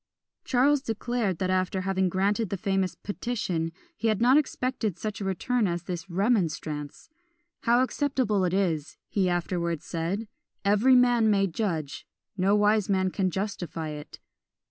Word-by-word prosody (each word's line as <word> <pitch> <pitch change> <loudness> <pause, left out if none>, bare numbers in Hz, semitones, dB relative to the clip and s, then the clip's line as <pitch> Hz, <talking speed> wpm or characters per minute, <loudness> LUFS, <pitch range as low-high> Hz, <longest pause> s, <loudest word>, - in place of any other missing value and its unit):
Charles 275 +3 +3
declared, 225 - -1
that 185 +1 -1
after 185 0 0
having 190 0 +1
granted 200 +3 0
the 200 - -2
famous 190 0 0
"Petition," 190 -7 -3 0.2
he 230 - -1
had 215 -2 +2
not 245 +3 +5
expected 255 - 0
such 210 +2 -4
a - - -2
return 210 +4 0
as 175 -1 -2
this 175 0 -5
"Remonstrance." 170 -7 -1 0.6
"How 240 +2 +5
acceptable 260 -7 0
it 180 - +1
is," 160 -6 -1
he 190 -3 +1
afterwards 170 -2 -1
said, 175 +7 -3 0.4
"every 210 +6 +5
man 245 -3 +4
may 195 -2 +3
judge; 165 -6 -3 0.3
no 195 +1 +3
wise 210 -1 +3
man 190 -1 +2
can 190 -1 0
justify 175 -4 -4
it." 150 -1 -8
195 Hz, 145 wpm, -27 LUFS, 175-225 Hz, 0.6 s, not